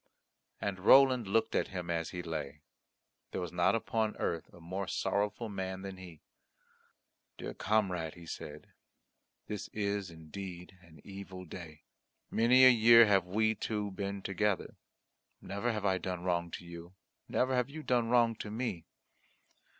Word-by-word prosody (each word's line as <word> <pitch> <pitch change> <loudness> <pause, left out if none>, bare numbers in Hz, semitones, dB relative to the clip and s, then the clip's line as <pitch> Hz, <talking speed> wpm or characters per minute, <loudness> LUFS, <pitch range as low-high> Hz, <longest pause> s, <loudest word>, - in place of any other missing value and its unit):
And 100 -2 -3
Roland 130 +2 +6
looked 110 +3 +1
at - - +1
him 90 -2 -5
as 80 -1 -1
he 90 -1 -5
lay. 75 -3 -5 0.7
There - - -4
was 90 -2 -4
not 90 +4 +3
upon 110 -1 -1
earth 85 -2 -2
a - - -15
more 95 +3 -4
sorrowful 105 +4 -1
man 95 -2 -4
than 95 -1 -6
he. 90 -5 -11 1.2
"Dear - - -6
comrade," 90 -7 0
he 85 -1 -12
said, 75 -2 -8 0.7
"this 105 -2 -5
is 100 -2 -1
indeed 90 +3 -9
an 85 -3 -17
evil 95 -2 -9
day. 80 -3 -10 0.5
Many 125 +3 +6
a - - +11
year 115 0 +8
have 95 -4 +3
we 110 +4 +2
two 105 -1 -3
been 100 0 -4
together. 100 0 -1 0.6
Never 100 +5 -2
have 105 -2 -3
I 95 -1 +2
done 90 -2 -4
wrong 85 -2 0
to 90 - -8
you; 85 +1 -10 0.3
never 130 +1 +1
have 125 0 +1
you 155 +2 -8
done 120 -4 +1
wrong 120 -1 +4
to 105 - -6
me. 110 -7 -4
95 Hz, 155 wpm, -32 LUFS, 85-110 Hz, 1.2 s, a